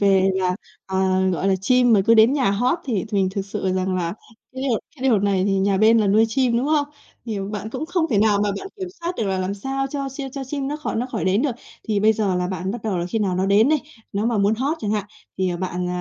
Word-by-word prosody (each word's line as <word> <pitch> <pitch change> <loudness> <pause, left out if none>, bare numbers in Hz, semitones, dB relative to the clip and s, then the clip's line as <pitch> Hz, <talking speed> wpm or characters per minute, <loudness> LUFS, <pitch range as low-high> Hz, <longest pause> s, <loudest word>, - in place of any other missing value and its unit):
về 195 -1 +4
là, 185 -1 0 0.3
ờ, 190 - -3 0.3
gọi 185 +2 0
là, 195 - +3
chim 250 +3 +4
mà 205 - +5
cứ 230 - +6
đến 220 +3 +6
nhà 270 -7 +2
hót 245 - +1
thì 220 -9 -1
thường 200 -3 +1
thực 195 0 -3
sự 190 -1 -2
rằng 185 0 0
là 170 +1 -2 0.4
cái 260 0 -6
điều 250 -5 +1 0.2
cái 255 - -11
điều 225 -5 +4
này 195 -1 +1
thì 200 - +1
nhà 195 0 +2
bên 220 +3 +5
này 210 -2 +2
nuôi 215 +3 +5
chim, 245 0 +1
đúng 250 +4 0
không? 300 -1 +2 0.4
Thì 220 -4 -3
bạn 210 +1 -5
cũng 315 - -4
không 350 -2 0
thể 215 - +2
nào 210 -1 +3
mà 205 - +1
bạn - - -7
kiểm 375 -2 -5
soát 340 +1 -2
được 225 - -1
là 190 -1 -1
làm 185 +2 -2
sao 270 +6 -3
cho 275 0 -4
chim 270 0 -6
cho 270 0 -6
chim 275 0 -3
nó 295 - -3
khỏi 305 - -4
nó 240 +3 -1
khỏi 220 - -2
đến 190 +5 +2
được. 290 - +1 0.4
Thì 210 -2 +1
bây 215 +2 +5
giờ 205 -3 0
là 180 0 0
bạn 185 0 -3
bắt 225 +1 -5
đầu 205 -5 -1
là 170 - -2
khi 205 +5 -2
nào 195 -4 0
nó 190 +1 +1
đến 205 +5 +4
đây, 310 0 +3 0.3
nó 205 +2 0
mà 235 -3 +1
muốn 200 +2 +3
hót 275 +8 -1
chẳng 210 - -2
hạn, 210 -2 0 0.3
thì, 185 -1 +1
ờ, 175 - -2
bạn, 180 0 -3
215 Hz, 285 wpm, -22 LUFS, 190-255 Hz, 0.4 s, cứ